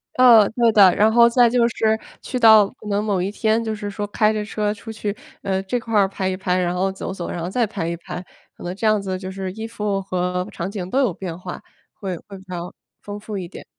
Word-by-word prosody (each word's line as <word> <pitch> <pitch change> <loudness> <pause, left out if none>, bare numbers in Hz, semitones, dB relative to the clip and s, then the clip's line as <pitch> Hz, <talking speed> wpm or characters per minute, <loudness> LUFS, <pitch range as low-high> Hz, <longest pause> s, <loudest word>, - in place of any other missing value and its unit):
呃， 235 -5 +7
对 230 0 +3
的， 195 -4 +6
然 215 +2 +4
后 235 +1 +6
再 240 0 +5
就 235 -1 +3
是 220 -1 +1 0.2
去 255 - -4
到 220 -3 +7
可 210 - -14
能 205 +1 0
某 200 -4 0
一 190 - -1
天 220 +2 +1
就 220 -1 -2
是 205 -1 -5
说 205 +1 -4
开 215 +1 +2
着 215 - -2
车 210 0 -2
出 225 +2 -9
去， 210 -2 -4 0.3
呃， 190 0 0
这 220 +6 -1
块 225 -1 -7
儿 195 - +4
拍 190 0 -3
一 185 - -1
拍， 185 -1 -1
然 180 -1 0
后 190 +2 0
走 190 0 -6
走， 180 -3 -5
然 - - -4
后 175 - -3
再 235 +2 +1
拍 195 -5 -4
一 170 - -2
拍， 175 - -7 0.4
可 - - -12
能 175 +1 -4
这 220 +2 -1
样 215 -1 +3
子 190 -1 -3
就 185 0 -6
是 190 -1 -5
衣 220 +2 -6
服 210 -3 -2
和 180 0 -2
场 190 0 -5
景 185 -4 -5
都 265 - +1
有 245 -9 +2
变 175 -2 -6
化， 180 -1 -7 0.3
会 190 -3 -5
会 195 +3 -12
比 190 - -14
较 175 0 -6 0.3
丰 205 0 -7
富 210 -1 -6
一 180 -2 -5
点。 - - -11
205 Hz, 280 characters per minute, -21 LUFS, 185-220 Hz, 0.4 s, 呃